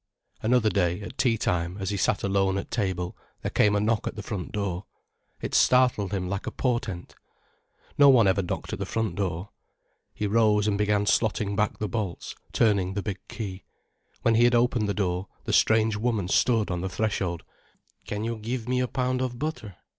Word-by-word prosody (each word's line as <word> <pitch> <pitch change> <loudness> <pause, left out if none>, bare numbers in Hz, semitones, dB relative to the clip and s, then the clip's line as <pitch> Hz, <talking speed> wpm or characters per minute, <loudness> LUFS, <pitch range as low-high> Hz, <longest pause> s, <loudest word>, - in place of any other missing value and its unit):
Another 110 -1 +3
day, 90 -3 +1
at 100 - -8
tea 120 -3 +3
time, 90 -2 -1
as 95 0 -2
he - - -1
sat 100 - +1
alone 95 0 +1
at 100 - -5
table, 95 -6 -2 0.3
there - - -2
came 105 0 +3
a - - +3
knock 110 +1 0
at - - -4
the 105 - -6
front 100 -6 -5
door. 100 -3 -3 0.6
It - - -4
startled 125 -6 +4
him 95 -3 -2
like 100 +2 -4
a - - -2
portent. 115 -8 -2 0.9
No 140 -1 +8
one 120 -6 +6
ever 95 +1 +3
knocked 90 - -4
at - - -4
the - - -2
front 110 -1 -1
door. 95 -1 -3 0.6
He 105 - -4
rose 105 -1 +3
and 105 - +2
began 105 0 +1
slotting 105 -1 +1
back 105 0 0
the 105 - -2
bolts, 100 -3 -4 0.2
turning 100 -4 +2
the 100 - -2
big 100 -3 -4
key. 95 -4 -6 0.6
When 115 - +4
he 115 +2 +5
had 120 0 +4
opened 120 -3 +2
the 100 - -1
door, 95 -1 -1 0.2
the - - -3
strange 110 0 +4
woman 110 -4 0
stood 110 +1 +2
on 90 -1 -2
the 95 - -2
threshold. 95 -5 -2 0.6
"Can 105 +1 -3
you 115 0 -2
give 115 +2 -4
me 125 0 +1
a 125 - +1
pound 130 0 -1
of 125 -2 -2
butter?" 120 - -4
105 Hz, 200 wpm, -26 LUFS, 95-115 Hz, 0.9 s, No